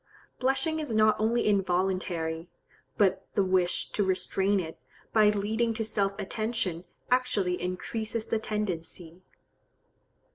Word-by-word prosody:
Blushing 270 +5 +1
is 295 -8 -2
not 215 0 +5
only 230 +2 +2
involuntary; 180 -4 0 0.5
but 190 -2 +2
the 200 - +4
wish 185 -1 +1
to 205 - +1
restrain 190 +1 +1
it, 165 -3 -6 0.3
by 215 -2 +6
leading 220 +3 0
to 225 0 -1
self 200 -2 -1
attention 200 -4 -2 0.3
actually 205 -8 +1
increases 220 +5 -3
the 225 - 0
tendency. 180 -5 -4
200 Hz, 115 wpm, -28 LUFS, 185-220 Hz, 0.5 s, by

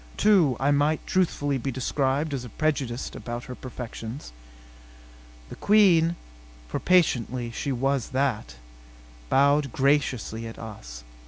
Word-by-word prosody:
Too, 180 - +4
I 140 +2 +2
might 145 +2 +1
truthfully 145 -7 0
be 135 - -3
described 135 +3 -1
as 130 -3 -3
prejudiced 135 -6 -1
about 120 0 -6
her 130 - -8
perfections. 120 - -8 1.2
The - - -8
Queen, 175 -6 +4 0.5
for - - -3
patently 125 -9 +1
she 140 +4 -3
was 135 0 0
that, 130 - -1 0.7
bowed 140 0 +3
graciously 130 -5 0
at 115 - -9
us. - - -9
135 Hz, 115 wpm, -26 LUFS, 120-150 Hz, 1.2 s, Too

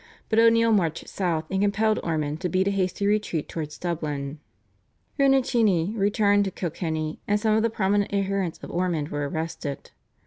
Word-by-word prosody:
But 225 - +3
O'Neill 230 0 +5
marched 170 -7 +1
south 170 -5 -1
and 190 0 0
compelled 215 +2 +2
Ormond 155 -2 -2
to 180 - -1
beat 190 +2 +1
a - - +2
hasty 190 0 -1
retreat 205 -7 0
towards 150 -2 -5
Dublin. 150 -4 -3 0.8
Rinucinni 235 -9 +3
returned 205 0 +3
to - - -1
Kilkenny, 160 -3 -3
and 205 0 +2
some 215 0 +2
of 220 - +3
the 230 - +2
prominent 205 -1 0
adherents 195 -3 -1
of - - -7
Ormond 170 -4 -1
were 145 -1 -2
arrested. 160 -2 -5
190 Hz, 165 wpm, -25 LUFS, 160-205 Hz, 0.8 s, O'Neill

